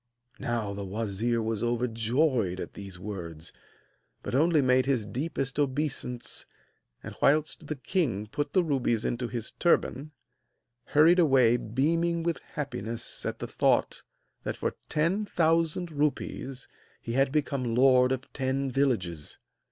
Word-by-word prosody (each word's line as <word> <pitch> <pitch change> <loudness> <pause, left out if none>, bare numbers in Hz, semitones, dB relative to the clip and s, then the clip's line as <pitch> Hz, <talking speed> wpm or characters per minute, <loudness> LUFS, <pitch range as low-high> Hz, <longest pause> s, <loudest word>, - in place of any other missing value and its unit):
Now 115 -4 -2
the 100 0 -5
wazir 110 +3 -1
was 110 -1 -2
overjoyed 120 - +1
at - - -6
these 100 -3 -9
words, 85 -5 -7 0.7
but - - -5
only 155 +4 +4
made 130 -1 +3
his 130 -6 +1
deepest 135 +2 -3
obeisance; 135 -3 -1 0.6
and, - - -7
whilst 155 +1 +2
the 155 - -2
king 130 - -1
put 145 +6 -3
the 185 - +3
rubies 125 -7 0
into 120 0 -1
his 120 -2 -4
turban, 155 -4 +1 0.8
hurried 165 +5 +5
away 130 -7 +5
beaming 165 +9 0
with 170 -1 -1
happiness 120 -6 -4
at - - -3
the - - -5
thought - - +1 0.4
that - - -4
for - - -1 0.2
ten 170 +7 +1
thousand 165 -1 +1
rupees 140 -3 -2 0.3
he 115 - -6
had 135 +1 +2
become 140 -5 0
lord 130 0 +5
of 130 0 -4
ten 135 0 -1
villages. 100 - -1
130 Hz, 135 wpm, -28 LUFS, 115-150 Hz, 0.8 s, hurried